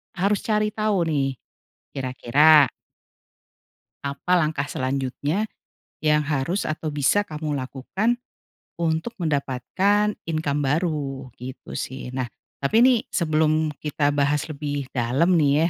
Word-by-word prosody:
harus 200 +3 +2
cari 210 -1 +2
tahu 215 -4 +1
nih 140 -3 +1 0.6
kira-kira 135 +3 +5 1.4
apa 140 +6 -1
langkah 150 -3 0
selanjutnya 140 - -1 0.5
yang 150 0 +4
harus 155 +6 -1
atau 155 0 -3
bisa 150 +8 +3
kamu 150 -2 -3
lakukan 165 - -1 0.6
untuk 165 +7 -1
mendapatkan 170 +9 +1
income 150 -3 0
baru, 140 -4 -1
gitu 130 +1 -7
sih. 130 -1 -5
Nah, 130 -1 -2 0.3
tapi 220 +12 +3
nih 250 -3 +6
sebelum 155 -2 +2
kita 145 -1 0
bahas 145 0 +1
lebih 145 -2 -4
dalam 135 +9 +2
nih 150 +3 +3
150 Hz, 110 wpm, -24 LUFS, 140-170 Hz, 1.4 s, nih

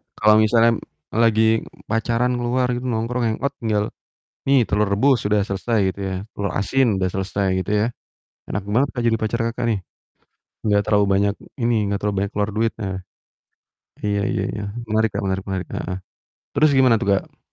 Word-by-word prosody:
Kalau 105 0 +5
misalnya 115 +1 +4 0.4
lagi 110 -1 +3 0.5
pacaran 115 +2 +1
keluar 125 +1 +1
gitu 125 +1 -3
nongkrong 120 +1 -1
hang 110 - -1
out 140 - +1
tinggal, 110 -3 +1 0.6
"Nih, 135 -2 +5
telur 105 -1 +1
rebus 120 +6 +3
sudah 105 -1 +2
selesai," 105 +3 -1
gitu 100 - -14
ya, 95 - -3 0.2
"telur 100 -2 -3
asin 120 +1 +2
udah 95 -1 0
selesai," 100 +1 -1
gitu 95 - -3
ya. 105 - +2 0.7
Enak 95 - -2
banget, 125 +7 +2
Kak, 120 - -3
jadi 115 - +3
pacar 110 +2 -1
Kakak 115 +2 -4
nih, 105 - 0 0.8
nggak 105 -2 +3
terlalu 105 -1 +3
banyak 100 +1 +2 0.2
ini, 120 -1 +1 0.2
nggak 100 - 0
terlalu 105 -1 -1
banyak 100 - -2
keluar 105 0 0
duit, 115 +1 +1
nah. 95 -3 -3 1.1
Iya 100 -1 +1
iya - - 0
ya, 105 - -4 0.3
menarik, 110 +1 +2
Kak, - - -2
menarik 95 0 -1
menarik, 95 -1 -3
heeh. 90 - -3 0.6
Terus 150 +1 +4
gimana 130 -3 +6
tuh, - - -1
Kak? - - -16
110 Hz, 180 wpm, -22 LUFS, 100-120 Hz, 1.1 s, gimana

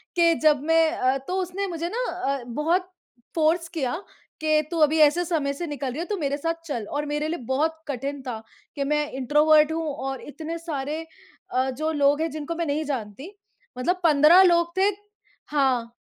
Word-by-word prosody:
कि 335 -1 +5
जब 300 -3 +4
मैं 325 0 +3
अ, 265 -5 +1
तो 315 +8 -5
उसने 375 +2 -3
मुझे 340 -1 -3
ना - - -2
अ, 275 -8 -2
बहुत 335 +9 0 0.5
फोर्स 330 +2 +2
किया 285 -7 -2 0.5
कि 310 -1 +3
तू 335 - -2
अभी 310 +1 +4
ऐसे 315 +4 +4
समय 300 -5 -1
से 340 +4 -5
निकल 285 -2 -4
रही 290 - -6
है, 345 - -2
तू 410 0 -3
मेरे 285 -3 -1
साथ 330 +2 -3
चल 240 -9 -4
और 295 +1 -2
मेरे 295 +1 -2
लिए 340 +2 -3
बहुत 320 +4 0
कठिन 275 +1 -4
था 225 -3 -4 0.3
कि 280 - -1
मैं 300 +1 +1
इन्ट्रोवर्ट 300 +4 +4
हूँ 325 0 -2
और 270 -1 -5
इतने 320 +3 -6
सारे 310 -1 -4 0.5
अ, 260 +1 +1
जो 310 +5 -2
लोग 290 0 +2
हैं 325 - 0
जिनको 310 +2 -5
मैं 335 0 -2
नहीं 295 +2 -1
जानती। 265 - -5 0.4
मतलब 360 +9 0
15 310 +3 +7
लोग 340 -1 +3
थे 390 +2 +4 0.6
हाँ। 260 -5 +1
305 Hz, 190 wpm, -25 LUFS, 280-335 Hz, 0.6 s, 15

